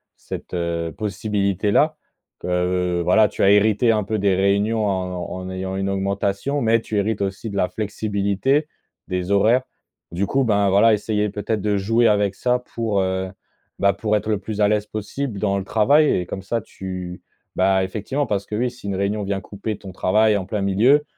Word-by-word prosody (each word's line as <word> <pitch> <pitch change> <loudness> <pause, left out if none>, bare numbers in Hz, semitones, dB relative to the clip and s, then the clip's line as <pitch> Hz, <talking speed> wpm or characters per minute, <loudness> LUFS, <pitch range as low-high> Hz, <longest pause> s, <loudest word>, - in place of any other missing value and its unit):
cette, - - -8
heu, 85 -1 -2
possibilité 100 -1 -1
là - - +3 0.4
que, - - -7
heu, 90 0 0
voilà, 90 +5 +4
tu 105 - -6
as 95 - +6
hérité 110 +3 +4
un 105 -1 +1
peu 110 +2 -2
des 100 -1 +2
réunions 100 +3 +1
en 95 -1 -2
en 95 0 -6
ayant 95 0 -4
une 95 0 -1
augmentation, 100 +7 -1
mais 115 -1 +3
tu 110 -1 -3
hérites 105 +1 0
aussi 100 +3 -3
de 100 - -5
la 90 - +1
flexibilité, 105 +6 0 0.4
des 90 +1 -2
horaires. 110 +6 +4 0.5
Du 90 +4 -1
coup, 135 +4 +1
ben, 100 -4 +2
voilà, 105 +4 +5
essayer 105 0 0
peut-être 105 +1 -2
de 105 0 +1
jouer 115 +4 +2
avec 105 -2 +2
ça, 125 0 +1
pour, 110 -4 0
heu, 95 0 -1 0.5
bah, 100 0 +3
pour 105 +2 0
être 105 +1 -2
le 105 - +2
plus 105 0 -4
à 105 - +5
l'aise 105 0 +1
possible 110 +2 -4
dans 100 -1 +1
le 95 - -2
travail 140 +10 +4
et 90 - -2
comme 95 - -6
ça 115 +4 -2
tu 90 -2 -7 0.3
bah, 95 0 +3
effectivement 110 +9 -2
parce 100 -4 -2
que, 105 - -5
oui, 125 +3 0
si 120 -5 -11
une 100 - -2
réunion 100 +2 -1
vient 100 0 -2
couper 100 +1 -5
ton 95 - -10
travail 105 +3 +2
en 95 - -4
plein 105 0 -3
milieu, 115 +10 +4
100 Hz, 200 wpm, -22 LUFS, 95-110 Hz, 0.5 s, as